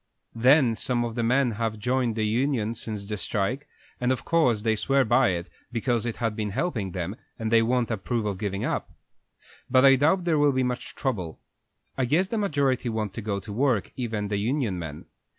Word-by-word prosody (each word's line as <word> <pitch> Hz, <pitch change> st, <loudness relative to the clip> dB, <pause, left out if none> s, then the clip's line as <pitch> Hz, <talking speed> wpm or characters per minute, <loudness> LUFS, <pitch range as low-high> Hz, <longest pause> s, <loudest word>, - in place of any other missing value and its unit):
Then 125 Hz, +1 st, +5 dB
some 120 Hz, +1 st, 0 dB
of 115 Hz, -, -4 dB
the 120 Hz, -, -2 dB
men 125 Hz, +2 st, +2 dB
have 110 Hz, 0 st, -2 dB
joined 125 Hz, +1 st, 0 dB
the 110 Hz, -1 st, 0 dB
union 115 Hz, 0 st, 0 dB
since 105 Hz, -3 st, -5 dB
the 105 Hz, +1 st, -4 dB
strike, 115 Hz, +8 st, -2 dB, 0.3 s
and 125 Hz, +1 st, +1 dB
of 130 Hz, -, -2 dB
course 125 Hz, -11 st, +2 dB
they 110 Hz, -1 st, +2 dB
swear 135 Hz, +4 st, +2 dB
by 120 Hz, +3 st, +4 dB
it, 85 Hz, -1 st, -2 dB, 0.2 s
because 120 Hz, 0 st, 0 dB
it 115 Hz, -, -3 dB
has 115 Hz, -3 st, -1 dB
been 105 Hz, -1 st, -3 dB
helping 110 Hz, -, -2 dB
them, 95 Hz, +2 st, -3 dB, 0.2 s
and 110 Hz, -1 st, -3 dB
they 115 Hz, -1 st, +6 dB
won't 120 Hz, +1 st, +1 dB
approve 110 Hz, +2 st, -2 dB
of 100 Hz, -3 st, -2 dB
giving 100 Hz, -1 st, -2 dB
up. -, -, -2 dB, 0.8 s
But 130 Hz, +1 st, +5 dB
I 135 Hz, -1 st, +7 dB
doubt 155 Hz, +8 st, +4 dB
if -, -, -9 dB
there 160 Hz, -3 st, +2 dB
will 145 Hz, -1 st, +4 dB
be 130 Hz, 0 st, +1 dB
much 125 Hz, -1 st, -3 dB
trouble. 95 Hz, -12 st, -3 dB, 0.6 s
I 130 Hz, -, +2 dB
guess 170 Hz, +9 st, +2 dB
the 225 Hz, -, -1 dB
majority 140 Hz, -, +1 dB
want 110 Hz, -3 st, -2 dB
to 115 Hz, -, -5 dB
go 100 Hz, -2 st, -2 dB
to 105 Hz, -, -8 dB
work, 120 Hz, -3 st, +1 dB
even 110 Hz, -5 st, -3 dB
the 100 Hz, -, 0 dB
union 110 Hz, -3 st, -1 dB
men. 80 Hz, -2 st, -7 dB
115 Hz, 210 wpm, -26 LUFS, 105-130 Hz, 0.8 s, I